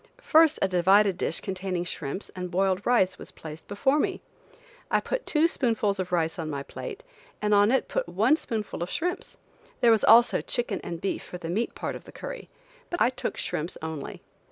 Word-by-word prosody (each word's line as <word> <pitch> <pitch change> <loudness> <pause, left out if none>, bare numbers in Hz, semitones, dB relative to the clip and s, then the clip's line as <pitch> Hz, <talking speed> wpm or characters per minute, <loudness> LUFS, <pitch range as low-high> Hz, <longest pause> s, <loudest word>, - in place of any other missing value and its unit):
First 320 -1 +5
a - - +4
divided 190 +2 +4
dish - - 0
containing 185 -2 -3
shrimps 165 +1 -5
and 180 -1 -4
boiled 190 +2 +1
rice 190 -7 +3
was - - -10
placed 155 0 -10
before 265 +8 +1
me. - - 0 0.7
I - - +3
put - - -4
two 310 +1 +4
spoonfuls 225 - 0
of 180 -1 -3
rice 165 -1 0
on 160 -1 -3
my 140 -2 -4
plate, 455 - -8 0.4
and 210 0 +1
on 205 +2 +5
it 265 - +2
put - - -2
one 215 - +3
spoonful 220 - -4
of 175 - -2
shrimps; 360 +3 -3 0.4
there 235 - +5
was 220 -2 +3
also 235 +2 +6
chicken 235 -5 -1
and 170 - -5
beef 195 - -2
for 180 - -8
the 170 -1 -5
meat 220 +6 -1
part - - -4
of - - -10
the - - -12
curry, - - -8 0.4
but 345 - -3
I 245 - +4
took 255 - -4
shrimps 160 +4 -3
only. 160 -3 -6
200 Hz, 200 wpm, -27 LUFS, 175-240 Hz, 0.7 s, also